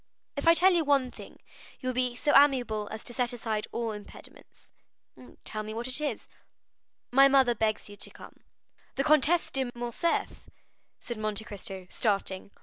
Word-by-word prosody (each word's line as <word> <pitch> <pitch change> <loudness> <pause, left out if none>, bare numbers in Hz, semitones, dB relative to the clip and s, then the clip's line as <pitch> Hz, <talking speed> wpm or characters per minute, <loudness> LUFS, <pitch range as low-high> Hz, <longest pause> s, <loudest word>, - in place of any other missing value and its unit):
"If 285 +2 -3
I 335 - +8
tell 365 +3 +5
you 340 -2 +2
one 275 -4 +2
thing, - - -13 0.4
you 255 - -6
will 255 - 0
be 250 -1 -1
so 290 +4 +1
amiable 250 -7 +4
as 220 - -7
to 240 - -7
set 245 0 0
aside 220 -3 -3
all 230 -1 -2
impediments." 210 -1 -13 0.7
"Tell 215 - -4
me 215 +1 -7
what 235 +2 -3
it 255 +4 +1
is." 300 - -3 0.8
"My 270 +2 +7
mother 270 -3 +4
begs 215 -1 -1
you 205 - -11
to 205 - -6
come." - - -14 0.6
"The 275 - 0
Comtesse 305 +3 +3
de 265 -2 -1
Morcerf?" 240 +8 -2 0.5
said 235 -2 -6
Monte 215 0 -2
Cristo, 195 -3 -7
starting. 200 -3 -1
245 Hz, 170 wpm, -28 LUFS, 215-275 Hz, 0.8 s, I